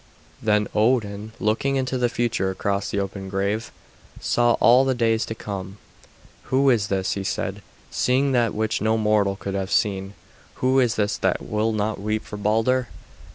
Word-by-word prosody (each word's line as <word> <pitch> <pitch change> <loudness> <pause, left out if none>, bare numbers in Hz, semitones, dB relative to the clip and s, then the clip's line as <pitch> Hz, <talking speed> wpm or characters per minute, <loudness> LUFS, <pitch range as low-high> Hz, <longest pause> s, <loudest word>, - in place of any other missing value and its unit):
Then 105 -1 +2
Odin, 110 -2 +1
looking 115 +6 0
into 130 -1 -1
the 120 -1 +2
future 115 -5 0
across 100 +1 -2
the 100 - -1
open 95 0 -4
grave, 100 +3 -2 0.5
saw 120 0 +2
all 125 +3 +5
the 135 -1 +1
days 115 -2 +1
to 110 - -4
come. 100 -2 -6 0.7
"Who 135 +1 +3
is 110 -5 +1
this," 95 -1 -1
he 100 - -2
said, 95 +2 -3 0.3
seeing 135 +2 +2
that 120 -3 +1
which 110 -1 -1
no 110 +1 +2
mortal 105 -2 +2
could 100 0 -5
have 95 -1 -2
seen; 95 -1 0 0.4
"who 130 +1 +2
is 120 -3 +2
this 105 -1 0
that - - 0
will 110 +1 0
not 105 -1 -2
weep 110 +1 -1
for 105 - -7
Balder?" 115 +5 +1
110 Hz, 170 wpm, -23 LUFS, 100-120 Hz, 0.7 s, all